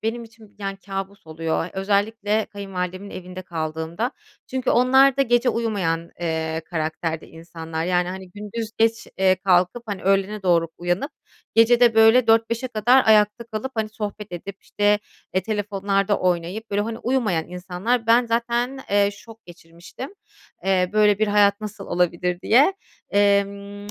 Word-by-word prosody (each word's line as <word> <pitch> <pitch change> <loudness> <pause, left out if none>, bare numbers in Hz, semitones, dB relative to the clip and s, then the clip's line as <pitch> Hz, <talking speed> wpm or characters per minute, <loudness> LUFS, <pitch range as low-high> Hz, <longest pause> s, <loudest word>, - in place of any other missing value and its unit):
benim 230 +2 -2
için 220 -2 -18
yani 195 -1 -4
kâbus 195 -1 -7
oluyor. 160 +1 -2
Özellikle 205 +2 0
kayınvalidemin 195 -1 -5
evinde 185 0 -8
kaldığımda. 160 +5 -3 0.4
Çünkü 260 -1 -2
onlar 265 +2 +5
da 275 - +4
gece 240 0 +2
uyumayan, 190 -9 -1
eee, 160 -1 -2
karakterde 160 -1 -3
insanlar, 165 0 -6
yani, 180 0 +1
hani, 185 0 -7
gündüz 210 +3 -6
geç, 225 0 +1
eee, 190 -1 +4
kalkıp, 185 +4 +2
hani, 200 -3 -5
öğlene 195 +2 +1
doğru 170 -3 +2
uyanıp 175 - -1 0.4
gece 230 +2 +5
de, 240 -2 +5
böyle, 225 +2 +6
4-5'e 230 +2 +2
kadar 240 +3 +3
ayakta 210 +1 +4
kalıp, 230 +3 -5
hani, 220 -1 -1
sohbet 210 -2 -6
edip, 190 +3 -8
işte, 205 0 +1 0.4
eee, 185 - +2
telefonlarda 200 -1 0
oynayıp, 180 +5 -2
böyle, 205 0 +1
hani, 225 +1 -4
uyumayan 225 -12 0
insanlar. 185 +7 -2
Ben 235 +2 +4
zaten, 240 +3 -1
eee, 200 0 +3
şok 225 +2 -15
geçirmiştim. 175 - -11 0.5
Eee, 185 -1 +2
böyle 210 -1 +4
bir 215 - +2
hayat 205 0 +3
nasıl 210 -2 -7
olabilir 180 0 0
diye. 270 - +4 0.4
Emm, 200 0 +1
200 Hz, 145 wpm, -23 LUFS, 180-225 Hz, 0.5 s, böyle